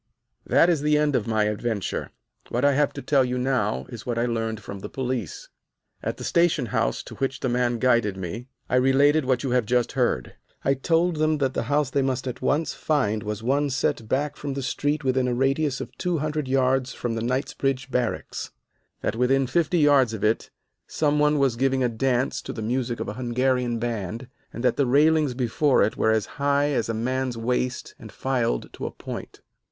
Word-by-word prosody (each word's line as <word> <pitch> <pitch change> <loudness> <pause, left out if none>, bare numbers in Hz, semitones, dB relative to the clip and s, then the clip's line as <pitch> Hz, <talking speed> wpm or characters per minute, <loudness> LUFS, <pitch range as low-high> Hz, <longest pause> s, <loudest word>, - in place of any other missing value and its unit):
"That - - +5
is 170 -5 +2
the 150 0 +3
end 150 -2 +2
of 120 - 0
my 110 -1 +2
adventure. 105 0 -2 0.4
What 125 +3 0
I 145 - +6
have 145 +1 +2
to - - -7
tell 140 -3 +3
you 125 0 -1
now 125 -5 0
is 120 -4 -8
what 120 0 -3
I 120 - +1
learned 115 -2 -2
from 100 -2 -8
the - - -7
police. 125 - -4 0.5
"At - - -3
the - - -7
station 170 -6 +2
house - - 0
to - - -10
which 135 0 -2
the 130 - 0
man 120 0 +1
guided 115 -5 +2
me 100 +7 -6 0.2
I 125 - +2
related 140 +3 +4
what 130 0 +1
you 135 - -1
have 125 -3 +1
just 125 0 +1
heard. 120 - 0 0.3
I 135 - +4
told 165 +5 +1
them 155 0 +2
that 135 -2 0
the - - -1
house 145 -2 +1
they 140 - +2
must 130 -1 -1
at 125 - -5
once 150 +1 +1
find 120 -9 0
was 105 +1 -5
one 140 +4 +1
set 115 -4 -1
back 145 +2 0
from 140 -2 -4
the 140 - -3
street 145 +3 -1
within 130 -1 +1
a 125 - 0
radius 135 +2 +1
of - - -7
two 180 -2 0
hundred 150 -1 -2
yards 130 0 +1
from 120 -2 -3
the 115 - -2
Knightsbridge 135 +1 -1
Barracks, 125 -2 -2 0.5
that - - -1
within 130 +3 +2
fifty 165 +6 +1
yards 140 -6 +4
of 105 - -7
it 110 +1 +1 0.4
some 150 -1 +1
one 150 0 +3
was 135 -4 +2
giving 130 +1 +1
a 125 - +2
dance 125 +2 0
to - - -6
the 110 - -5
music 120 +1 -1
of - - -3
a 105 - -3
Hungarian 125 0 +1
band, 115 +1 -4 0.2
and 120 - -7
that 125 - +2
the 140 - +2
railings 150 0 +3
before 130 +2 +2
it 105 - 0
were - - +1
as 110 -2 +2 0.2
high 145 +1 +2
as 120 -5 0
a 115 - -1
man's 130 +2 -1
waist 125 +2 -2
and - - -11
filed 125 - -1
to - - -5
a - - -5
point. - - -8
130 Hz, 210 wpm, -25 LUFS, 120-140 Hz, 0.5 s, I